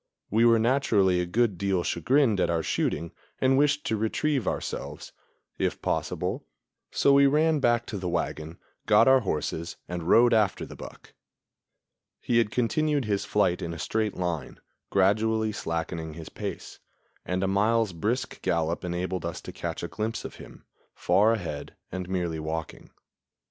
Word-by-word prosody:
We 115 +3 +4
were 115 -1 +6
naturally 110 -7 +2
a 90 - -3
good 105 -1 +1
deal 95 -3 0
chagrined 115 - +2
at - - +2
our 85 -1 0
shooting 85 +2 -1 0.3
and 130 0 +3
wished 145 +1 +2
to 110 - 0
retrieve 120 +4 0
ourselves, - - -4 0.5
if - - -1
possible; - - -2 0.5
so 140 - +3
we 140 0 +6
ran 155 +2 +3
back 120 -3 +2
to 105 - -5
the 90 -1 -3
wagon, 85 -1 -3 0.3
got - - +6
our 130 0 +7
horses 85 - -3
and 85 -1 -4
rode 120 +1 +6
after 105 -4 +2
the - - -11
buck. - - -12 1.1
He 120 -1 +2
had 115 - +2
continued 145 +4 0
his 100 -2 -1
flight 95 -4 +1
in 85 0 -4
a - - -7
straight 110 +1 -1
line, 90 -3 -3 0.3
gradually 110 +3 +2
slackening 80 -4 -4
his 80 -1 -8
pace, - - -7 0.4
and 90 +1 -2
a - - +1
mile's 105 +1 +2
brisk 110 +9 -2
gallop 85 0 0
enabled 90 +1 -3
us 85 0 -4
to - - -8
catch - - -5
a - - -2
glimpse 110 +1 -4
of - - -8
him, - - -13 0.3
far 105 +3 +3
ahead 85 -9 -5 0.2
and 95 0 -5
merely 85 -4 -2
walking. 80 +1 -5
100 Hz, 160 wpm, -27 LUFS, 85-115 Hz, 1.1 s, our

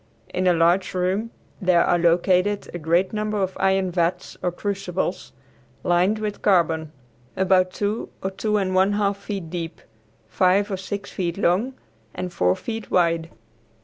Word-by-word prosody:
In 185 0 +1
a 180 - +5
large 175 +3 +2
room 190 +5 0 0.3
there 180 -2 +4
are 175 - +2
located 180 +4 +2
a 175 - -4
great 170 +5 +1
number 215 0 -1
of 190 -1 -1
iron 190 -1 +2
vats 170 0 -1
or 180 - 0
crucibles, 190 -1 -3 0.5
lined 180 +5 +2
with 215 -1 -4
carbon, 165 -5 +2 0.5
about 185 -1 +3
two 205 +3 -2
or 190 - -1
two 210 +2 0
and 190 -2 0
one 190 +2 +3
half 200 -1 +1
feet 200 -5 -6
deep, 165 -2 -5 0.5
five 190 - +2
or 190 - -1
six 200 +2 -6
feet 175 -2 -2
long 205 +8 +1 0.4
and 180 -1 -4
four 90 - +2
feet 225 -2 -6
wide. 170 -2 +2
185 Hz, 155 wpm, -23 LUFS, 175-200 Hz, 0.5 s, a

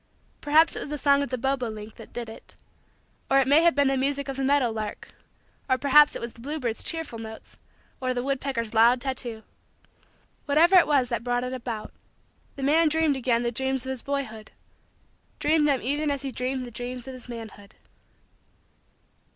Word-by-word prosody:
Perhaps 310 +3 +4
it - - -3
was - - -6
the 295 - -3
song 280 -1 +3
of 280 - -3
the 255 - -2
bobo 260 -1 -1
link 215 0 -8
that - - -12
did 240 -1 -5
it; 220 - -11 0.7
or 270 - +4
it 270 -1 +3
may 290 +4 +6
have 340 -4 +4
been 285 -1 +3
the 270 - +2
music 280 +1 -1
of 270 - -4
the 270 - -3
meadow 270 -3 +2
lark; 215 -1 -6 0.6
or 260 - +3
perhaps 290 +2 +5
it - - -4
was 235 - -5
the 230 - -15
bluebird's 255 -4 -3
cheerful 325 -8 -3
notes, 220 0 -10 0.4
or 255 0 0
the 245 -1 -2
woodpecker's 265 -4 -2
loud 235 +3 +5
tattoo 240 -4 -3 1.0
whatever 325 +6 +5
it 360 - +7
was 270 -5 +2
that 235 -2 -2
brought 245 0 0
it 250 +1 -4
about, 235 -4 -6 0.6
the 275 - -6
man 310 +3 +4
dreamed 320 -2 +2
again 240 -2 0
the 240 - -1
dreams 265 +1 -2
of 260 - -3
his 260 -2 -5
boyhood 245 -7 -4 0.9
dreamed 300 0 +2
them 275 -3 +1
even 290 +4 0
as 280 -1 -2
he 270 - -4
dreamed 255 +1 -3
the 240 - -9
dreams 245 +2 -6
of 265 - -6
his 250 -1 -11
manhood. 220 -3 -9
260 Hz, 195 wpm, -26 LUFS, 235-280 Hz, 1.0 s, it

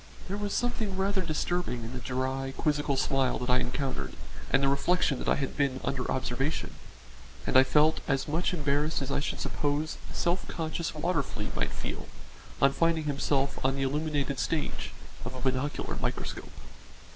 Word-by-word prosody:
There 190 - -2
was 205 0 -2
something 220 -5 0
rather 195 0 +2
disturbing 160 -6 -1
in 115 +2 -6
the 130 - -3
dry, 130 +2 -2
quizzical 145 -2 +1
smile 130 -1 +2
that 125 0 -1
I 125 - +5
encountered 135 +1 -2 0.4
and 140 - +4
the - - +5
reflection 140 0 +2
that - - -1
I - - +5
had 135 -2 -2
been 140 -3 +1
under 130 -2 -1
observation, 130 +3 -1 0.7
and - - -1
I 130 - +10
felt 150 +3 +4
as 135 +2 +1
much 160 +4 +1
embarrassed 150 -2 +1
as 135 - -3
I - - +2
should 145 - -2
suppose 145 +2 -1
a - - -8
self 175 +2 +1
conscious 160 0 -2
water 165 +1 +1
flea - - -5
might - - +1
feel - - -5 0.5
on 135 0 +5
finding 165 -1 +2
itself 140 -1 +1
on 135 +1 +3
the 135 - 0
illuminated 145 -1 0
stage 155 +7 -1 0.3
of 130 - -5
a - - -5
binocular 130 +3 -1
microscope. - - -3
140 Hz, 175 wpm, -30 LUFS, 135-160 Hz, 0.7 s, I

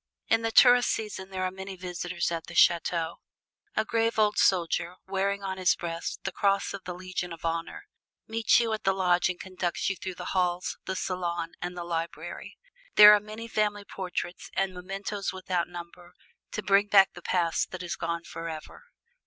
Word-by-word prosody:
In 225 0 +4
the 225 - 0
tourist 245 +1 +7
season 210 -3 -3
there 190 -1 -3
are 185 - 0
many 190 +1 -7
visitors 180 -1 -3
at 165 -1 -4
the 170 - -9
chateau. 170 -1 +3 0.6
A 215 - +1
grave 230 +1 0
old 210 -1 +3
soldier, 175 -1 +2
wearing 195 +1 -1
on 190 -1 -4
his 185 -1 +4
breast 170 -1 -5
the 190 - -2
Cross 200 +1 +1
of 200 -1 -8
the 180 -1 -5
Legion 185 -1 -4
of 165 0 -8
Honor, 165 - -3 0.4
meets 225 +1 +3
you 230 -2 0
at 215 - -4
the 195 - +3
lodge 180 -1 +3
and 180 - -4
conducts 185 0 -2
you - - -3
through 185 0 -6
the - - -5
halls, 180 -1 0
the 190 - -3
salon 175 -3 -2
and 180 0 -4
the 175 - -4
library. 170 -1 -5 0.4
There 210 0 +11
are 210 - +5
many 215 +2 -8
family 210 -2 0
portraits, 180 -2 -5
and 195 0 0
mementos 195 +2 -4
without 185 -2 -2
number, 175 0 -10 0.4
to 215 - -3
bring 200 +1 +4
back 195 -2 +6
the 180 - -11
past 170 -2 0
that 185 -1 -6
is 175 - -3
gone 170 0 -3
forever. 165 - -8
185 Hz, 185 wpm, -28 LUFS, 175-200 Hz, 0.6 s, There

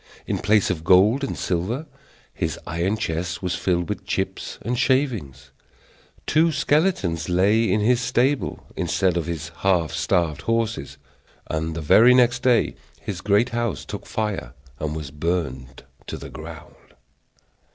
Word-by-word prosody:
In - - -2
place 105 -1 +3
of 80 -3 -4
gold 100 +10 +5
and 135 - -3
silver, 95 - -2 0.5
his - - -2
iron 85 +5 -1
chest 85 -2 -3
was 90 -1 -1
filled 85 -1 0
with - - -4
chips - - -3
and 120 +4 -1
shavings; 110 - 0 0.7
two 160 +2 +3
skeletons 145 - +1
lay 100 +4 +3
in 105 +2 +2
his 120 +3 +3
stable 130 +3 0
instead 95 -2 +1
of 85 -1 -1
his 85 -1 -4
half 90 -5 +1
starved 85 -4 0
horses, 115 - -1 0.5
and 80 0 -2
the 85 - -3
very 115 +11 +6
next 125 -1 +4
day 125 -2 +3 0.3
his 95 -4 -5
great 105 +4 +3
house 120 - -2
took - - -7
fire 105 -2 -3 0.2
and 75 0 -3
was 75 -3 -6
burned 75 -5 -3 0.2
to - - -5
the - - -9
ground. - - -11
95 Hz, 145 wpm, -23 LUFS, 85-120 Hz, 0.7 s, very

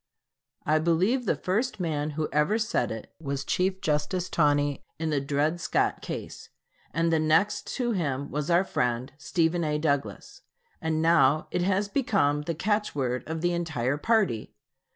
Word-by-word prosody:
I 155 +1 +3
believe 185 +11 +2
the - - +3
first 220 +6 -1
man 155 -3 -1
who 155 -1 0
ever 150 +9 +2
said 220 - 0
it 110 -1 -7
was 140 -3 -3
Chief 185 +1 0
Justice 155 +4 -1
Taney 145 -2 +2
in 160 0 -2
the 145 -2 +1
Dred 150 +4 0
Scott - - 0
case, - - -7 0.4
and 165 +1 +1
the 160 - +3
next 160 +7 +2
to 245 -2 0
him 140 - -2
was 150 +1 -2
our 175 +2 +4
friend, 125 -6 -1
Stephen 165 +5 +1
A. 150 -1 0
Douglas. 140 -9 -2 0.4
And 160 0 0
now 155 -3 +4
it 180 - 0
has 195 +2 +1
become 200 - +1
the 165 +2 -3
catchword 150 - -1
of 160 0 -3
the 175 0 +1
entire 145 -6 -1
party. 195 - +1
160 Hz, 160 wpm, -27 LUFS, 145-185 Hz, 0.4 s, our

